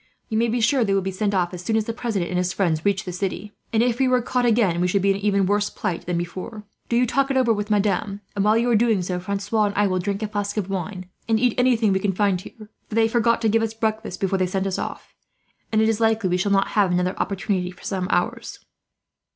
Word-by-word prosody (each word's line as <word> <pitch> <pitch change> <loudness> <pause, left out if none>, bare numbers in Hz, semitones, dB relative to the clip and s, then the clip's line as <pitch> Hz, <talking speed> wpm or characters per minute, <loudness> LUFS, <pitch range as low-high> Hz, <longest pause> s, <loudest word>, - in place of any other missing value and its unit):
You 220 - -1
may 235 - +2
be 235 +2 0
sure 240 +3 +3
they 200 -2 +1
will 195 - +1
be 190 - -2
sent 200 +1 -1
off, 180 -1 0
as 180 0 -7
soon 220 +4 +1
as 220 - 0
the 230 - -3
president 215 -7 -2
and 180 - 0
his 180 +1 -1
friends 165 -5 0
reach 200 0 +1
the 185 - -5
city; 195 +2 -4 0.2
and 225 0 +3
if 245 0 0
we 265 - +3
were 255 0 +3
caught 245 0 0
again, 210 -7 +2
we 180 - +2
should 190 +1 +1
be 200 - +4
in - - +1
an - - -9
even 200 -1 +2
worse 205 +2 +1
plight 170 -2 -4
than 175 -1 0
before. 185 +5 -5 0.3
Do 235 - +1
you 245 +1 +4
talk 270 +3 +1
it 270 - +1
over 245 -3 +3
with 210 0 -3
Madame 200 -1 0
and, 200 - +1
while 215 +2 +4
you 235 +1 +1
are - - +4
doing 220 -4 +2
so, 180 0 -2
Francois 200 +3 -1
and 200 - -2
I 205 - +3
will 185 -2 0
drink 200 +3 -2
a - - -1
flask 205 0 -3
of 195 -2 -2
wine, 185 0 -4 0.2
and 220 -1 +3
eat 245 0 +2
anything 240 -5 +3
we 190 - +1
can 195 0 0
find 195 -2 +1
here; 215 +2 -13 0.2
for 215 - -5
they 225 0 +4
forgot 230 0 +1
to - - +3
give 225 +1 +3
us 225 0 -2
breakfast 220 -3 -2
before 195 0 0
they 185 - +2
sent 190 +1 -2
us 190 -1 -2
off, - - -6 0.6
and 220 0 +3
it - - +3
is 225 0 0
likely 220 -4 +2
we 180 - +2
shall 200 +3 0
not 195 0 +2
have 200 -4 +2
another 180 +1 0
opportunity, 190 -2 -1
for 180 - -14
some 185 -2 -2
hours." 175 - -1
205 Hz, 280 wpm, -23 LUFS, 185-225 Hz, 0.6 s, be